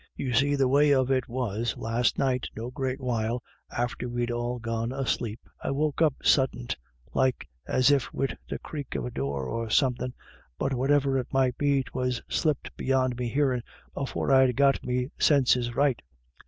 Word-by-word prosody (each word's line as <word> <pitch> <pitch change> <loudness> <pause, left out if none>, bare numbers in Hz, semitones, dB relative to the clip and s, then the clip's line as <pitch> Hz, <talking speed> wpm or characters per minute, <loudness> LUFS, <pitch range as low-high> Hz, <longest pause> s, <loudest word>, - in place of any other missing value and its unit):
" - - -57
You 130 -2 -3
see 140 +4 +3
the 135 -2 +3
way 145 +3 +4
of 130 0 +2
it 130 -1 +1
was, 115 -2 -2
last 115 +2 0
night, 130 -3 +1
no 115 +3 -5
great 130 +1 -2
while 120 -2 -1 0.3
after 120 0 -3
we'd 120 0 -1
all 120 +1 -2
gone 115 0 -2
asleep, 120 -4 -2 0.2
I - - -1
woke 145 +2 0
up 155 -5 +4
suddint, 125 -3 +2 0.4
like 130 -7 +1 0.2
as 130 +2 +4
if 140 -3 +1
wid 135 - -2
the - - -2
crake 145 -4 -7
of - - -2
a 125 - -4
door, 70 - -2
or 115 - -3
something 125 +1 +1 0.4
but 135 - -1
whatever 135 +1 +2
it 125 - -4
might 130 -2 +2
be, 140 -2 +2
'twas 125 -1 -2
slipped 155 -5 -1
beyond 130 -1 +1
me 120 -1 -1
hearin' 130 -1 +1 0.3
afore 135 0 -2
I'd 130 -2 +5
got 140 0 +3
me 125 +2 -1
sinses 125 -4 +3
rightly. 140 -4 +2
130 Hz, 180 wpm, -27 LUFS, 120-135 Hz, 0.4 s, I'd